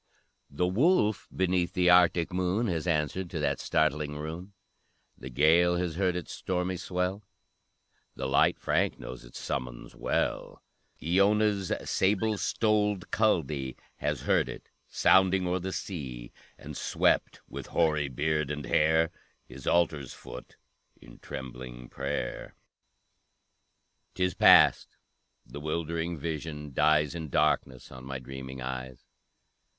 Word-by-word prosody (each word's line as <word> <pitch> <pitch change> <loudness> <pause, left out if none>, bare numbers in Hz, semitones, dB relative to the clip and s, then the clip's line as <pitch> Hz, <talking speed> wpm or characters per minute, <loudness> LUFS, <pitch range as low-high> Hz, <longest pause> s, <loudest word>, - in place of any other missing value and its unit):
The 75 +6 -1
wolf 110 - +2
beneath 90 -1 0
the 90 -1 +4
Arctic 90 -1 +4
moon 95 +5 0
Has 85 -5 -2
answered 85 +3 -1
to 80 - -4
that 70 -2 0
startling 75 -1 0
rune; 80 +6 -7 0.6
The 65 - -9
Gael 80 +7 +4
has 85 -1 -1
heard 90 +1 0
its 90 -3 -5
stormy 90 0 -2
swell, 90 +2 -2 0.9
The - - -4
light 70 - +3
Frank - - 0
knows 60 -1 -9
its - - -12
summons - - -5
well; - - -2 0.4
Iona's 100 +2 +2
sable 105 +2 +1
stoled 105 -3 0
Culdee 75 - 0 0.2
Has - - -2
heard - - +2
it - - -9 0.2
sounding 95 0 +4
o'er 90 +1 0
the 95 +1 -4
sea, 65 -12 -6 0.3
And - - -9
swept, - - +1
with - - -8
hoary 75 -4 +1
beard 75 +2 -1
and 75 -1 -4
hair, 80 +1 +3 0.3
His 65 +1 -11
altar's 75 -6 +1
foot - - -11 0.4
in - - -15
trembling 60 -2 -8
prayer! 70 -2 -4 1.6
'Tis 90 -1 0
past, - - +5 0.5
the 65 +4 -9
'wildering 85 +2 -3
vision 75 -1 -5
dies 75 0 +3
In 80 -3 -6
darkness 70 -3 0
on 65 -1 -10
my 65 0 -5
dreaming 65 0 -8
eyes! 65 0 -6
80 Hz, 125 wpm, -29 LUFS, 70-90 Hz, 1.6 s, past